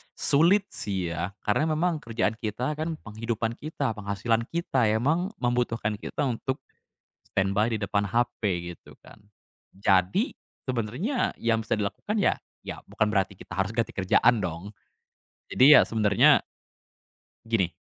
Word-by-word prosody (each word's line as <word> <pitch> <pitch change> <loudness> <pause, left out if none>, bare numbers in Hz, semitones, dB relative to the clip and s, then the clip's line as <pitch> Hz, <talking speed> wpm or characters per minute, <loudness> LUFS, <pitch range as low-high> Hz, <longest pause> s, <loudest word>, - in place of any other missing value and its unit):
sulit 170 +8 +4
sih 95 -4 -3
ya 85 +4 -4
karena 155 +9 +1
memang 165 0 0
kerjaan 115 -4 -1
kita 125 +6 -2
kan 160 +1 -2
penghidupan 115 +1 -3
kita, 145 -3 -3
penghasilan 105 +3 -1
kita, 135 -8 +1
emang 155 - +1
membutuhkan 120 -3 0
kita 145 - -3
untuk 130 +2 -2 0.7
standby 100 +4 +1
di 110 - -1
depan 100 0 0
HP 100 -6 -1
gitu 85 - -16
kan. - - -15 0.6
Jadi 95 -1 +2 0.4
sebenernya 130 - -1
yang 115 -1 +1
bisa - - 0
dilakukan 105 - -3
ya, - - +3 0.3
ya - - -6
bukan 110 - 0
berarti 100 -1 0
kita - - -12
harus 95 +2 0
ganti 115 -2 -1
kerjaan 105 +3 +3
dong, 90 +4 -5 0.8
jadi 145 +4 +8
ya - - +7
sebenernya 105 -3 +4 1.0
gini, 110 -6 +1
115 Hz, 135 wpm, -26 LUFS, 100-130 Hz, 1.0 s, jadi